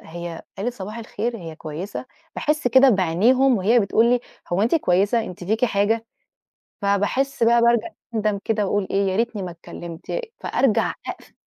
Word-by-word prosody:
هي 170 0 -7 0.2
قالت 240 +5 -2
صباح 210 +3 -7
الخير؟ 230 +1 -3
هي 165 -4 -8
كويسة؟ 165 +10 -6 0.3
باحسّ 300 -3 0
كده 260 +2 +6
بعينيهم 230 +8 +3
وهي 225 +6 +4
بتقول 220 +3 +3
لي، 245 0 +3 0.3
هو 190 +4 +2
أنتِ 235 - +2
كويسة؟ 205 - +2
أنتِ 180 -2 -8
فيكِ 220 +6 +1
حاجة؟ 225 +1 +1 0.8
فباحسّ 205 +7 +1
بقى، 235 +1 +5
بارجع 235 +6 +3 0.3
أندم 210 -2 0
كده، 215 -2 +1
وأقول 200 0 0
إيه 195 0 +2
يا - - -2
ريتني 230 -1 -1
ما 180 - -5
اتكلمت، 170 0 -10
ي - - -1 0.2
فأرجع 255 -6 +1
أقفل - - -8
210 Hz, 165 wpm, -22 LUFS, 190-235 Hz, 0.8 s, كده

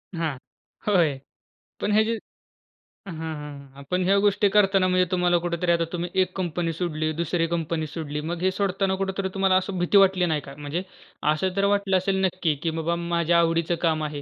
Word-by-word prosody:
हां, 160 -5 -2 0.5
होय 165 -9 +3 0.6
पण 210 - 0
हे 215 +1 +5
जे 225 - -1 1.0
हां, 175 - -6 0.2
हां, 140 -2 -10
पण 180 0 +1
ह्या 195 +2 +4
गोष्टी 205 0 +3
करताना 195 -2 +3
म्हणजे 185 0 +3
तुम्हाला 180 -1 +3
कुठेतरी 170 0 0
आता 170 -1 +2
तुम्ही 175 0 -3
एक 185 0 -2
कंपनी 175 -2 -2
सोडली. 155 -2 -2
दुसरी 165 +1 -1
कंपनी 165 -1 -2
सोडली. 150 -1 -5
मग 175 0 -4
हे 185 +1 +2
सोडताना 195 0 0
कुठेतरी 190 0 -2
तुम्हाला 195 -1 +2
असं 190 0 -5
भीती 175 +3 +3
वाटली 190 -2 +5
नाही 155 -3 0
का? 140 0 -11
म्हणजे 150 +5 -4 0.5
असं 185 +4 -2
तर 200 0 +2
वाटलं 200 -2 +2
असेल 190 +1 0
नक्की 180 -4 0
की 165 - +1
बाबा 170 +2 0
माझ्या 170 0 +2
आवडीचं 165 0 +1
काम 160 -2 +1
आहे. 150 -1 -4
175 Hz, 185 wpm, -25 LUFS, 160-190 Hz, 1.0 s, हे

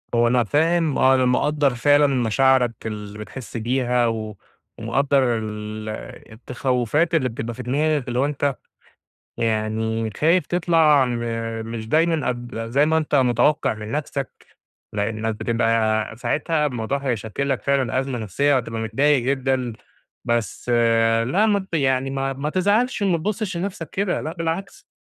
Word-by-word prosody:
هو 120 0 +4
أنا 120 0 +3
فاهم 160 - +1
آه 130 0 +5
أنا 130 - +2
مقدّر 145 +3 +2
فعلًا 145 +4 +4
مشاعرك 130 -1 +2
اللي 105 -1 -6
بتحس 110 +3 -8
بيها 125 +1 +1
و 110 -3 -4 0.4
ومقدّر 130 +1 +1
ال 110 0 -6 0.4
التخوفات 125 +6 0
اللي 130 -5 +1
بتبقى 115 0 -5
في 125 - -8
دماغك، 145 +2 0
اللي 120 0 -1
هو 135 - +3
أنت 145 -2 -1 0.8
يعني 110 0 -1
خايف 170 +4 +2
تطلع 165 -5 +3
أنب 120 -2 -2 0.5
مش 115 -1 -6
دايمًا 160 +1 +2
قبل 120 -2 -4
زي 140 +5 +3
ما 160 0 +2
أنت 150 -2 -2
متوقع 125 0 +2
من 105 0 -8
نفسك، 145 -2 -4 0.5
لإنّك 110 +1 -2
بتبقى 115 -1 0
ساعتها 150 +5 0
الموضوع 125 0 -2
هيشكِل 125 0 -3
لك 135 -2 -1
فعلًا 135 -3 +1
أزمة 130 -2 -4
نفسيّة 140 +8 +1
وهتبقى 115 -3 -2
متضايق 135 +5 +2
جدًا، 130 -2 0 0.5
بس 120 0 -2 0.6
لأ 200 - +2
ما 200 -3 +1
ت - - -1
يعني 135 -2 +1
ما 135 0 -2
ما 140 +3 -3
تزعلش 205 +6 +1
وما 180 -4 +2
تبصش 200 +1 -3
لنفسك 175 -4 -4
كده 195 -1 -1
لأ 155 - -4
بالعكس، 165 +3 -4
130 Hz, 145 wpm, -22 LUFS, 115-150 Hz, 0.8 s, آه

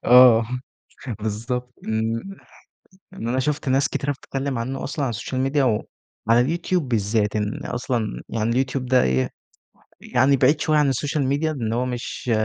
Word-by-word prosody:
آه 125 -2 +8 0.8
بالضبط، 120 +4 -3
ن 110 +1 0 1.0
يعني 120 -11 -5
أنا 130 - 0
شُفت 145 0 -1
ناس 135 +2 +3
كتيرة 145 +1 -1
بتتكلم 135 -1 -4
عنه 130 +4 -3
أصلًا 145 0 -2
على 125 - -1
السوشيال 115 +4 -3
ميديا 135 +1 +2
وعلى 115 0 0
اليوتيوب 170 +2 0
بالذات، 105 -1 +1
لإن 105 0 -2
أصلًا 120 - -2
يعني 115 0 -1
اليوتيوب 130 +1 0
ده 125 0 +4
إيه 65 0 +1 0.7
يعني 130 +2 +3
بعيد 145 +4 +4
شوية 155 -1 +2
عن 145 -2 +4
السوشيال 140 +2 -1
ميديا 150 +3 +1
إن 115 -6 -2
هو 125 +2 0
مش 125 0 -4
125 Hz, 155 wpm, -23 LUFS, 115-140 Hz, 1.0 s, آه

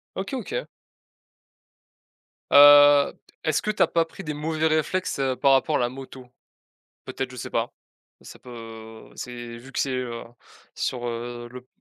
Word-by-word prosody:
OK, 195 +8 -4
OK. 455 - -4 1.9
Heu, 145 0 +8 0.3
est-ce 155 -2 +1
que 215 - -1
tu 215 - -4
as - - +6
pas 165 - +2
pris 165 - -11
des 150 - -4
mauvais 155 +1 -1
réflexes, 155 +2 -1
heu, 135 -1 0
par 135 +1 +4
rapport 140 +3 +2
à - - -2
la 120 - +1
moto? 130 0 -10 0.8
Peut-être, 130 -1 -4
je 130 - -11
sais - - -6
pas? 115 +1 -1 0.5
Ça - - -13
peut, 125 - -14 0.6
heu, - - -19
c'est 120 -1 -7
vu 130 +3 -13
que - - -4
c'est 135 - 0
heu, 120 -2 -4 0.5
sur, 120 -1 -3
heu, 120 0 -5
le 125 0 -10
p - - -35
135 Hz, 175 wpm, -24 LUFS, 125-155 Hz, 1.9 s, Heu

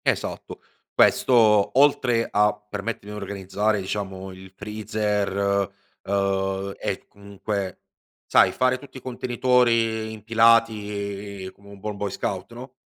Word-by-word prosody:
Esatto. - - -2 0.3
Questo, 110 -3 +4
oltre 125 -5 +3
a 105 +1 +3
permettermi 105 0 -6
di 105 - -6
organizzare, 100 +2 -1
diciamo, 95 -1 -4
il 95 0 -12
freezer, 105 -1 -2 0.7
uhm, 95 0 -1
e 95 - -4
comunque 100 -1 -5 0.4
sai, - - +5
fare 130 0 +1
tutti 135 0 -12
i - - -10
contenitori 120 -3 +1
impilati 105 -3 +1
come 100 0 -18
un 100 -1 -12
buon 105 0 -5
boy 100 0 -2
scout, 95 +1 -4
no, 125 +2 -10
105 Hz, 115 wpm, -24 LUFS, 100-115 Hz, 0.7 s, sai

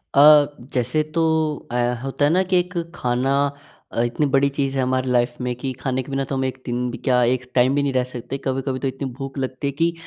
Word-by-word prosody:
अ, - - +5 0.5
जैसे 125 +4 +1
तो 165 - +3 0.5
अ, - - -3 0.3
होता 135 +2 0
है 145 - +3
ना 180 +3 +4
कि 185 0 +1
एक 180 0 -3 0.2
खाना 125 +1 0 0.6
अ, - - +1
इतनी 120 +5 0
बड़ी 140 +1 +4
चीज़ 140 -1 -2
है 135 - +1
हमारी 130 0 0
लाइफ 120 0 +2
में 125 0 -2
कि 130 +2 -4
खाने 130 -1 -1
के 140 - -11
बिना 135 0 0
तो 135 - -3
हम 130 - 0
1 130 0 -4
दिन 125 +1 -1
भी 120 - -6
क्या, 125 -2 +2
1 125 +1 0
टाइम 130 +2 +4
भी 145 - +2
नहीं 140 - 0
रह 130 -1 +2
सकते। 125 +2 -5
कभी-कभी 130 0 -1
तो 135 - -1
इतनी 135 +1 -4
भूख 135 +1 -7
लगती 130 +1 -3
है - - 0
कि 165 +4 +1
130 Hz, 245 wpm, -22 LUFS, 125-140 Hz, 0.6 s, अ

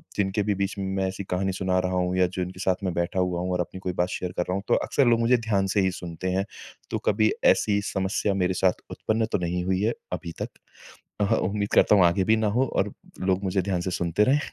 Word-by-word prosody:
जिनके 100 +1 0
भी 105 0 0
बीच 100 0 -2
मैं 95 0 -1
ऐसी 95 +1 -4
कहानी 95 +1 -1
सुना 95 0 0
रहा 90 0 -1
हूँ 90 0 0
या 90 -1 +4
जो 90 +1 -4
जिनके 90 +1 -8
साथ 95 +1 0
मैं 90 - -1
बैठा 85 +2 -1
हुआ 90 -1 0
हूँ 90 +1 -2
और 90 - -1
अपनी 95 - -6
कोई 90 -1 -3
बात 90 0 +1
शेयर 90 -1 -3
कर 90 - +2
रहा - - 0
हूँ 100 - -3
तो - - +4
अक्सर 140 - +1
लोग 115 -1 +4
मुझे 120 +2 +4
ध्यान 105 -4 0
से 100 - +4
ही 95 0 +2
सुनते 90 0 -5
हैं। 95 +2 0 0.5
तो - - 0
कभी 110 0 +3 0.2
ऐसी 100 -1 0
समस्या 95 +1 0
मेरे 95 -1 +1
साथ 90 0 +1
उत्पन्न 110 +1 0
तो - - +2
नहीं 90 0 -2
हुई 95 0 +1
है 110 +3 +1 0.2
अभी 90 -1 -4
तक। - - -2 0.7
अहा 100 - +3
उम्मीद 100 +2 -1
करता 105 - +6
हूँ 95 - +6
आगे 85 +3 +3
भी 110 +3 +4
ना 110 -1 +1
हो 130 - +4
और - - 0 0.3
लोग 95 +1 0
मुझे 95 0 +1
ध्यान 90 -1 -1
से 95 - -3
सुनते 85 +4 +1
रहें। 135 +6 +3
95 Hz, 255 wpm, -26 LUFS, 90-100 Hz, 0.7 s, करता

